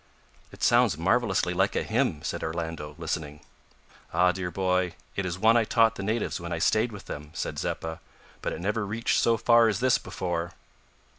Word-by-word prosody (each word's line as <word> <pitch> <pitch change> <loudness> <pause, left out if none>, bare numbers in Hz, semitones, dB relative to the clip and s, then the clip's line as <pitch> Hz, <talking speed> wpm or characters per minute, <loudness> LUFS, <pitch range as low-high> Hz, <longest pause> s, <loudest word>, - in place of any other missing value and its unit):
"It - - -10
sounds 120 -6 +4
marvellously 95 0 +1
like 95 +3 +1
a - - +1
hymn," 110 - 0
said - - -3
Orlando, 80 -2 -4
listening. 80 -3 -4 0.7
"Ah! 90 +2 +4
dear 90 -1 -4
boy, 90 -1 0 0.2
it 95 -1 -1
is 90 0 -3
one 110 +4 +4
I 120 - +5
taught 115 0 +3
the 100 - -7
natives 105 -1 -1
when 85 0 -6
I 85 - -1
stayed 110 +8 +2
with 105 -2 -10
them," 75 +1 -7
said - - -3
Zeppa; 80 0 -3 0.4
"but - - -2
it - - -5
never 105 +3 -1
reached 110 +3 0
so 115 -1 +3
far 115 +1 +5
as 110 - 0
this 130 0 +3
before." 85 -1 -4
95 Hz, 190 wpm, -27 LUFS, 85-115 Hz, 0.7 s, I